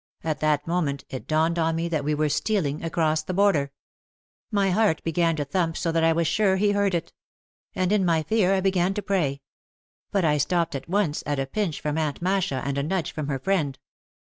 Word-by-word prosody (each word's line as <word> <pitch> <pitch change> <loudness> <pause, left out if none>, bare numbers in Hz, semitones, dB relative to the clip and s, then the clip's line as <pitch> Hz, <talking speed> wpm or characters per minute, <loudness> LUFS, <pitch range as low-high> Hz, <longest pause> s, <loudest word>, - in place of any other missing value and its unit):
At 155 -2 -2
that 150 -1 +1
moment 155 -5 -1
it 130 - -6
dawned 160 +2 +1
on 165 0 +1
me 165 +1 -1
that 155 -3 -1
we 150 +1 0
were 155 +1 +1
stealing 155 -3 -1
across 160 -1 +1
the 175 +3 -5
border. 175 -9 +2 0.8
My 200 -3 +1
heart 205 -4 +2
began 165 0 +1
to 145 -2 -2
thump 165 +2 -1
so 165 - -1
that 165 0 +1
I 165 - +5
was 165 +1 +1
sure 190 +4 +2
he 205 +2 +2
heard 200 -2 +1
it. 165 - -4 0.6
And 185 0 0
in 210 -2 +3
my 165 -3 +2
fear 195 +2 +2
I 190 - +1
began 190 0 +1
to 210 - -3
pray. 150 -9 0 0.7
But 195 -4 +1
I 150 -1 +2
stopped 170 +3 +1
at 135 +3 -6
once, 185 -6 0
at 145 -1 0
a 135 - 0
pinch 175 +2 -2
from 150 +1 -1
Aunt 150 -3 -2
Masha 180 -7 0
and 140 0 -1
a - - -1
nudge 170 0 -1
from 150 -2 -4
her 140 -2 -1
friend. 145 -3 -1
165 Hz, 220 wpm, -25 LUFS, 150-190 Hz, 0.8 s, I